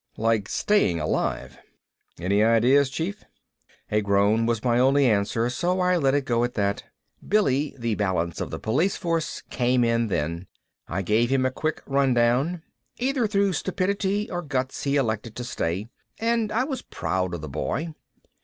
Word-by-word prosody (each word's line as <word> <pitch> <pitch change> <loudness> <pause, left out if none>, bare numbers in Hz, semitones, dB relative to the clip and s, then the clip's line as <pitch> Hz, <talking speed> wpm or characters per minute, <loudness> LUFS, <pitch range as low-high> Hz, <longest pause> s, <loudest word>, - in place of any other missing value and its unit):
Like 110 -2 +1
staying 205 - +2
alive. 75 0 -2 0.6
"Any 100 +4 +2
ideas, 125 +5 +4
Chief?" 175 +9 -4 0.7
A 105 0 +2
groan 100 +3 +2
was 115 -2 -1
my 120 -1 +2
only 135 +2 +4
answer 110 +1 +1
so 180 +7 0
I 180 0 +3
let 135 -4 +2
it 145 -2 0
go 120 -1 +1
at 120 0 -2
that. 100 -1 0 0.5
Billy, 145 -9 +1
the 115 -2 -1
balance 90 -5 -1
of - - -3
the - - -5
police 155 - 0
force, 165 -2 -2
came 125 0 +2
in 115 0 +1
then. 85 0 -2 0.4
I 95 +3 -2
gave 110 +6 +2
him 130 -1 +2
a 130 - +1
quick 155 +4 -3
rundown. 135 +4 +2 0.3
Either 255 -2 0
through 200 -2 +1
stupidity 195 +4 -1
or 175 -1 -2
guts 135 -5 -3
he 140 0 +1
elected 110 -4 -1
to 125 - -5
stay, 95 -3 -3 0.3
and 230 -1 0
I 240 +4 +1
was 270 -1 -4
proud 90 -1 -2
of 85 - -7
the 80 - -6
boy. 150 - -3
125 Hz, 165 wpm, -25 LUFS, 105-165 Hz, 0.7 s, ideas